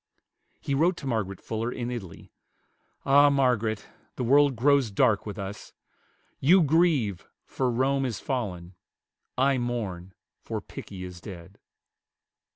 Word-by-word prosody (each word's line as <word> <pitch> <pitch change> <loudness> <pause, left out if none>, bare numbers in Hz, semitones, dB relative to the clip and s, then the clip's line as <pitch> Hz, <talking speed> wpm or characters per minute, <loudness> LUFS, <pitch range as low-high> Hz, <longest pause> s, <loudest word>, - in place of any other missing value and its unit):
He 140 - -3
wrote 170 +6 +2
to - - -8
Margaret 105 -7 -2
Fuller 115 +2 -3
in 120 0 -4
Italy, 95 -9 -8 0.7
"Ah, 145 +1 +6
Margaret, 125 -6 +1 0.3
the - - -3
world 140 +2 +4
grows 135 0 +3
dark 105 +1 +2
with 105 0 -6
us! 100 +1 -7 0.7
You 175 +6 +5
grieve, 150 - +2 0.2
for 130 -2 -1
Rome 135 +3 +1
is 115 -6 -4
fallen; 95 -10 -4 0.6
I 135 0 +3
mourn, 100 -7 -4 0.2
for - - -5
Pickie 95 -2 -9
is 90 -1 -9
dead." 95 -1 -11
120 Hz, 130 wpm, -27 LUFS, 100-135 Hz, 0.7 s, Ah